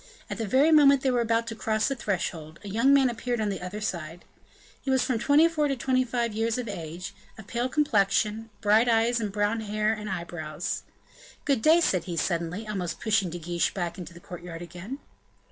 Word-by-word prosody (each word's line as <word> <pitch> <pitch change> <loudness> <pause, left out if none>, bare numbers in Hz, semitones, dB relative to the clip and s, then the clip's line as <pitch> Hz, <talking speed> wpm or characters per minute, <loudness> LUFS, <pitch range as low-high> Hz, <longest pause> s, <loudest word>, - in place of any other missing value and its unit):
At - - -4
the 225 - -2
very 275 +9 +4
moment 280 -3 +6
they 265 - +2
were 245 -1 +2
about 230 0 +1
to 230 -1 -5
cross 220 -1 0
the 275 - -1
threshold, 170 -8 -3
a - - -8
young 230 +7 +3
man 275 -2 +6
appeared 240 0 -2
on 215 -1 0
the 195 - -4
other 180 +4 -5
side. 170 -4 -4 0.6
He - - -5
was 265 -1 +3
from 255 -3 0
twenty 290 +7 +5
four 305 -3 0
to 275 - 0
twenty 255 0 +1
five 235 -2 -1
years 225 +2 0
of 250 -2 -4
age, 170 -2 -6 0.2
of 220 - -11
pale 240 +4 -2
complexion, 220 -5 +1
bright 220 +3 +4
eyes 230 +1 +3
and 210 -3 -2
brown 205 +2 0
hair 215 0 0
and 210 -1 -6
eyebrows. 170 -3 -4 0.6
"Good 275 -6 +2
day," 320 +6 +5
said 185 - +1
he, 175 -2 -4
suddenly, 170 +5 -2
almost 180 -5 -3
pushing 210 -5 +1
De 175 - -5
Guiche 170 +1 -1
back 175 -2 -3
into 180 0 -7
the - - -11
courtyard 175 -1 -8
again. 180 - -7
215 Hz, 210 wpm, -27 LUFS, 180-245 Hz, 0.6 s, moment